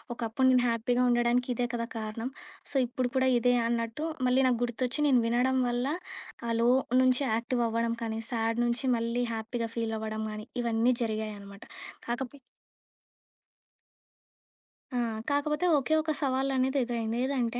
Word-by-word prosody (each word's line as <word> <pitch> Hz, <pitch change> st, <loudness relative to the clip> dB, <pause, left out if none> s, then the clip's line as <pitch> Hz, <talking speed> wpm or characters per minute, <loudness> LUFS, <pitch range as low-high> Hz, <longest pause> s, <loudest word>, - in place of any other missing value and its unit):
ఒకప్పుడు 235 Hz, +3 st, 0 dB
నేను 250 Hz, -1 st, +4 dB
హ్యాపీగా 245 Hz, +2 st, +1 dB
ఉండడానికి 240 Hz, +1 st, +2 dB
ఇదే 245 Hz, +1 st, 0 dB
కదా 230 Hz, 0 st, -2 dB
కారణం. 225 Hz, +3 st, -4 dB, 0.4 s
సో, -, -, -8 dB
ఇప్పుడు 250 Hz, 0 st, -1 dB
కూడా 260 Hz, 0 st, +3 dB
ఇదే 245 Hz, +1 st, +3 dB
అన్నట్టు, 230 Hz, +5 st, -2 dB, 0.2 s
మళ్ళీ 260 Hz, +1 st, +3 dB
నాకు 240 Hz, -2 st, +1 dB
గుర్తొచ్చి 250 Hz, +3 st, -3 dB
నేను 255 Hz, -4 st, +5 dB
వినడం 255 Hz, +3 st, +2 dB
వల్ల, 245 Hz, +2 st, -1 dB, 0.6 s
ఆ -, -, -2 dB
లో 235 Hz, -, +4 dB, 0.3 s
నుంచి 255 Hz, +2 st, +3 dB
యాక్టివవ్వడం 230 Hz, -1 st, 0 dB
కానీ, 225 Hz, 0 st, -3 dB
సాడ్ 230 Hz, 0 st, 0 dB
నుంచి 240 Hz, +2 st, 0 dB
మళ్ళీ 235 Hz, +2 st, -1 dB
హ్యాపీగా 230 Hz, +1 st, -3 dB
ఫీలవ్వడం 220 Hz, -1 st, -2 dB
గానీ, 215 Hz, 0 st, -7 dB, 0.2 s
ఇవన్నీ 235 Hz, +1 st, +2 dB
జరిగాయనమాట. 210 Hz, -2 st, -5 dB, 0.4 s
కాకపోతె 245 Hz, +3 st, -4 dB, 2.6 s
ఆ! -, -, +2 dB, 0.3 s
కాకపోతే 300 Hz, +4 st, +1 dB
ఓకె 275 Hz, +3 st, 0 dB
ఒక 310 Hz, 0 st, -1 dB
సవాలనేది 265 Hz, 0 st, +1 dB
ఎదురైంది. 230 Hz, -1 st, -2 dB
ఏదంటే, 245 Hz, -3 st, -1 dB
240 Hz, 135 wpm, -29 LUFS, 230-255 Hz, 2.6 s, నేను